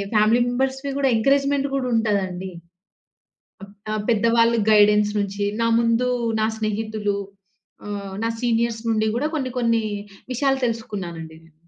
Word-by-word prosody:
Family 215 +3 +4
మెంబర్స్‌వి 265 +2 -1
కూడా 270 -2 +2
encouragement 275 +4 +2
కూడా 260 -2 -1
ఉంటదండి. 190 -4 -1 1.1
అప్ 200 +1 -16 0.2
ఆహ్, 215 -1 -2
పెద్ద 225 -1 +1
వాళ్ల 230 0 +4 0.2
గైడెన్స్ 210 0 +5
నుంచి, 200 0 -2 0.2
నా 230 - +2
ముందు 235 +2 +2 0.3
నా 215 - +2
స్నేహితులు, 215 -1 -2 0.7
ఆహ్, 200 -2 -5
నా 230 - +1
సీనియర్స్ 230 -1 0
నుంచి 220 0 +1
కూడా 300 +3 0
కొన్ని, 260 -4 -3
కొన్ని 230 -2 +1 0.5
విషయాలు 270 +1 +1
తెలుసుకున్నానండి 175 -8 -5
నేను. 165 -1 -23
220 Hz, 135 wpm, -22 LUFS, 205-245 Hz, 1.1 s, గైడెన్స్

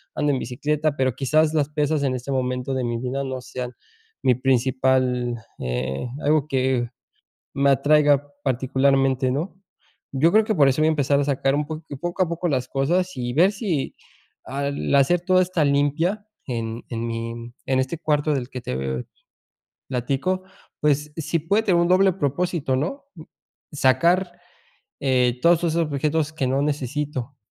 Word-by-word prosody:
ando 145 -1 +1
en 130 - 0
bicicleta, 150 +5 -1
pero 130 -2 +1
quizás 155 +4 +2
las 150 -2 +1
pesas 150 0 0
en 135 -2 +1
este 125 +2 -5
momento 125 0 -1
de 130 - -1
mi 120 -1 -2
vida 130 +2 -2
no 130 -1 -4
sean 125 0 -6 0.5
mi 125 - +4
principal 130 -1 +1 0.3
eh, 65 - -2 0.2
algo 150 0 +2
que 130 -3 0 0.7
me 140 0 +4
atraiga 145 +1 +4 0.2
particularmente, 135 0 +2
¿no? 155 +8 -3 0.6
Yo 160 +6 +4
creo 220 +3 +5
que 220 - +1
por 145 -5 +5
eso 135 - 0
voy 155 - +4
a - - +4
empezar 140 -2 +2
a 145 - +2
sacar 135 -1 +1
un 150 +1 0
poc 155 +1 -6 0.2
poco 175 +2 -2
a 170 - -4
poco 170 +1 -2
las 130 -3 -1
cosas 175 +7 +1
y 120 -1 -3
ver 175 +8 +5
si 190 - -2 0.5
al 140 +2 -2
hacer 155 +6 +4
toda 185 +1 +3
esta 175 -4 0
limpia 145 +8 +1 0.2
en 115 -2 -4
en 115 -1 -3
mi 115 0 -3 0.4
en 130 -1 +2
este 130 +6 -1
cuarto 150 -1 +1
del 130 -2 -3
que 125 - -6
te 65 - -3 0.8
platico. 135 +9 -1 0.4
Pues, 150 0 +1
sí 165 +1 -1
puede 200 +8 +1
tener 180 -5 +3
un 170 - +2
doble 190 +1 +5
propósito, 160 -3 -1
¿no?, 170 - -3
mm, 160 - -9 0.5
sacar, 170 +7 +2 0.6
eh, 125 -2 +2
todos 170 0 +5
esos 165 -1 0
objetos 155 -1 0
que 155 -4 -2
no 135 +2 +1
necesito, 145 -2 -3
140 Hz, 165 wpm, -23 LUFS, 130-155 Hz, 0.8 s, creo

